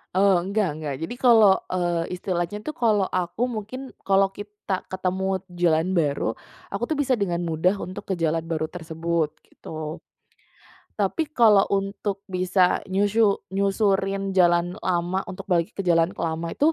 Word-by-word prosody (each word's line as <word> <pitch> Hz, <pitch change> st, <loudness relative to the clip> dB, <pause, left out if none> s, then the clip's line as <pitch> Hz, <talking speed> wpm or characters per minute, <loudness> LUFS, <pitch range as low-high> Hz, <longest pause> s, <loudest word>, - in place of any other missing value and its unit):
Eee, 190 Hz, -2 st, +4 dB
enggak 195 Hz, -2 st, 0 dB
enggak. 150 Hz, -2 st, -4 dB
Jadi 240 Hz, -, -7 dB
kalau, 225 Hz, -6 st, +7 dB, 0.2 s
eee, 175 Hz, -1 st, -1 dB
istilahnya, 180 Hz, +3 st, -3 dB
tuh, 310 Hz, -, -3 dB
kalau 215 Hz, -7 st, +2 dB
aku 185 Hz, +6 st, -1 dB
mungkin 250 Hz, +3 st, -6 dB
kalau 195 Hz, 0 st, +2 dB
kita 205 Hz, -2 st, -5 dB
ketemu 190 Hz, 0 st, -2 dB
jalan 175 Hz, 0 st, +2 dB
baru, 145 Hz, -9 st, +1 dB, 0.4 s
aku, 200 Hz, -, -3 dB
tuh, 310 Hz, -, 0 dB
bisa 275 Hz, -3 st, +1 dB
dengan 200 Hz, -7 st, 0 dB
mudah 170 Hz, +4 st, +1 dB
untuk 185 Hz, +1 st, -7 dB
ke -, -, +2 dB
jalan 165 Hz, -1 st, +1 dB
baru 160 Hz, -1 st, -2 dB
tersebut, 165 Hz, -1 st, -2 dB, 0.2 s
gitu. 155 Hz, 0 st, -8 dB, 1.0 s
Tapi 250 Hz, -, 0 dB
kalau 220 Hz, -8 st, +5 dB
untuk 195 Hz, 0 st, -2 dB
bisa 185 Hz, -1 st, +2 dB
nyusyu 205 Hz, +2 st, +3 dB, 0.2 s
nyusurin 195 Hz, 0 st, +1 dB
jalan 175 Hz, -1 st, +3 dB
lama 180 Hz, +1 st, 0 dB
untuk 185 Hz, -, -8 dB
balik 170 Hz, -3 st, +1 dB
ke 195 Hz, -, -3 dB
jalan 165 Hz, -1 st, +4 dB
lama 165 Hz, 0 st, -2 dB
itu 305 Hz, +3 st, +3 dB
190 Hz, 145 wpm, -24 LUFS, 170-200 Hz, 1.0 s, kalau